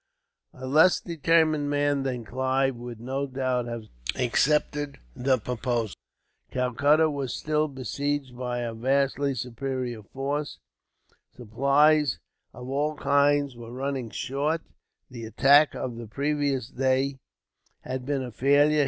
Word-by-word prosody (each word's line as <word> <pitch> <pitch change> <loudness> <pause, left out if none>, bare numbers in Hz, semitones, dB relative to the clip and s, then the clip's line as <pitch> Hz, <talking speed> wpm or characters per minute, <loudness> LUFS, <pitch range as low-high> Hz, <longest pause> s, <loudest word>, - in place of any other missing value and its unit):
A 130 - -8
less 155 +7 +5
determined 160 -2 +2
man 145 -1 +1
than 125 -3 -3
Clive 130 +2 0
would, 120 -1 -8
no 135 +4 -3
doubt, 130 -2 -1
have 115 -1 -5 0.3
accepted 145 +3 +1 0.2
the 130 +1 +2
proposal. 120 -2 -2 0.6
Calcutta 140 +5 +3
was 140 -4 -3
still 155 0 0
besieged 140 0 -3
by 125 -1 -3
a 120 -1 -3
vastly 135 +3 +1
superior 125 -1 -4
force, 140 +7 -4 0.8
supplies 140 - +3 0.3
of 125 0 -10
all 145 +3 -1
kinds 145 -2 +2
were 115 -1 -10
running 130 -1 -3
short, 145 +8 -1 0.5
the 120 -2 -8
attack 140 +6 +5
of 120 -2 -4
the 115 -1 -7
previous 140 0 -1
day 135 +1 0 0.6
had 130 0 -4
been 135 0 -1
a 125 - -6
failure. 145 +5 +4
135 Hz, 125 wpm, -26 LUFS, 125-145 Hz, 0.8 s, less